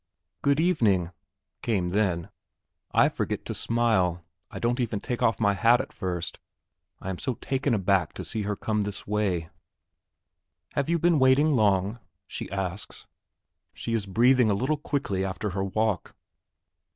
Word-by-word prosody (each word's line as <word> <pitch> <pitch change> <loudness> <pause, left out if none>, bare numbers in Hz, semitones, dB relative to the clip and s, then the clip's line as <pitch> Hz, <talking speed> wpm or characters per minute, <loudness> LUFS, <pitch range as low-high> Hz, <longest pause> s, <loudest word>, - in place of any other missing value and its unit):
"Good 140 +1 +2
evening," 110 - +2 0.5
came 95 -7 0
then. 90 -4 0 0.6
I - - +5
forget - - -3
to - - -3
smile; 95 -8 +1 0.2
I - - -8
don't 120 +2 0
even 115 -4 -1
take 120 +3 -4
off 115 -4 +2
my 100 -2 +3
hat 115 +5 +4
at - - -5
first, 90 -4 -3 0.6
I 95 - -4
am 90 - -6
so 130 -3 -2
taken 135 0 -1
aback 95 -5 +1
to - - -6
see 110 - -3
her 105 0 -2
come 105 +1 -1
this 100 0 -4
way. 95 -6 -1 1.2
"Have 140 +2 -1
you 170 - +3
been 170 -1 +3
waiting 130 +4 +5
long?" 105 -3 +2 0.3
she - - -6
asks. 95 0 -5 0.7
She 115 - -4
is 110 -3 -1
breathing 120 +4 +4
a 100 - +2
little 130 +9 0
quickly 115 -12 -2
after 95 +2 -3
her 95 +1 -2
walk. 110 +1 -1
105 Hz, 155 wpm, -27 LUFS, 95-125 Hz, 1.2 s, I